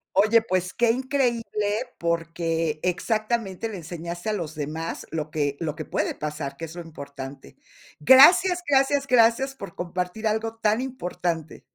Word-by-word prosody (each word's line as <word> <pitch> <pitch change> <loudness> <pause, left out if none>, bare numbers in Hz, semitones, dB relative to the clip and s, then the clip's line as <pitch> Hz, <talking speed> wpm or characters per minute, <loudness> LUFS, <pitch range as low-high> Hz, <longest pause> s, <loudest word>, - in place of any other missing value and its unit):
Oye, 215 +4 +5
pues, 185 -4 -1
qué 235 -1 +3
increíble, 255 -2 0 0.5
porque 165 -2 -1
exactamente 215 +2 -1
le 210 - -6
enseñaste 170 +3 -6
a - - 0
los 165 -6 -4
demás 155 +2 -5
lo 155 -1 -3
que 145 -2 -1
lo 155 -3 -2
que 155 - -5
puede - - -1
pasar, 150 -2 -5
que 165 - -5
es 160 +1 -11
lo 175 - -6
importante. 140 -4 -9 0.5
Gracias, 350 - +7
gracias, 275 0 +3
gracias 250 +2 +4
por 200 -9 -9
compartir 180 +4 -3
algo 220 +1 -1
tan 220 +1 +1
importante. 180 - -4
180 Hz, 150 wpm, -25 LUFS, 160-230 Hz, 0.5 s, Gracias